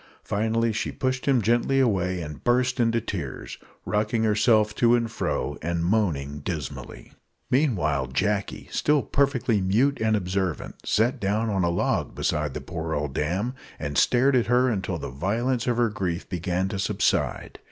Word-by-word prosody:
Finally, 115 +2 0
she 110 - -2
pushed 130 0 -2
him 130 -5 +3
gently 120 +5 +2
away 95 -8 +1
and 75 -3 -8
burst 125 +1 +2
into 115 -1 +2
tears 90 - -6 0.3
rocking 110 +2 0
herself 110 0 +3
to 120 +2 +4
and 115 -1 -1
fro, 75 - -2
and 85 +1 -1
moaning 80 -8 0
dismally. 75 -1 -6 0.4
Meanwhile 90 - +1
Jacky, 100 +10 -1
still 150 -2 +2
perfectly 130 -6 +1
mute 120 +10 +2
and 110 0 +2
observant, 95 -3 -3
sat 115 +4 +2
down 105 +3 0
on 95 -2 +1
a 85 - +2
log 85 - -1
beside 75 -2 -1
the - - -4
poor 80 -2 -4
old 75 -2 -2
dame, 95 - -1 0.2
and 70 -1 -4
stared 130 - +4
at 120 - +2
her 125 +2 +3
until 100 -5 -2
the - - -6
violence 115 - -1
of 120 -1 +1
her 120 -1 +3
grief 90 -4 -3
began 90 +1 -1
to 95 - -4
subside. 100 - 0
105 Hz, 165 wpm, -25 LUFS, 85-120 Hz, 0.4 s, to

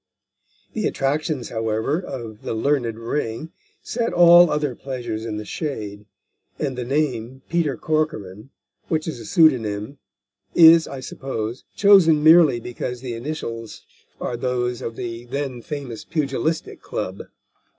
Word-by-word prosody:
The 215 - 0
attractions, 145 -1 -1
however, 110 +6 -1
of 115 - -7
The - - -4
Learned 120 -2 0
Ring, 115 +5 -3 0.3
set 235 0 -2
all 175 0 +8
other 150 -3 0
pleasures 120 -4 -5
in 110 -2 -4
the 105 - -6
shade, 105 -8 -5 0.5
and 135 -3 -2
the 125 - -3
name, 130 -2 -2
Peter 165 -7 0
Corcoran, 135 - -2 0.4
which 155 0 -1
is 155 -7 -4
a 115 - -9
pseudonym, 125 -4 +2 0.6
is, 165 -1 +8
I 135 -1 -7
suppose, 125 -3 -5
chosen 180 -7 +6
merely 160 -6 +7
because 120 +1 -5
the 125 -2 -5
initials 115 -3 -6 0.4
are 120 - -3
those 125 -1 -1
of 115 - -5
the 115 0 -6
then 130 -1 -4
famous 135 -4 -6
Pugilistic 155 +1 -2
Club. - - -5
130 Hz, 130 wpm, -22 LUFS, 115-155 Hz, 0.6 s, all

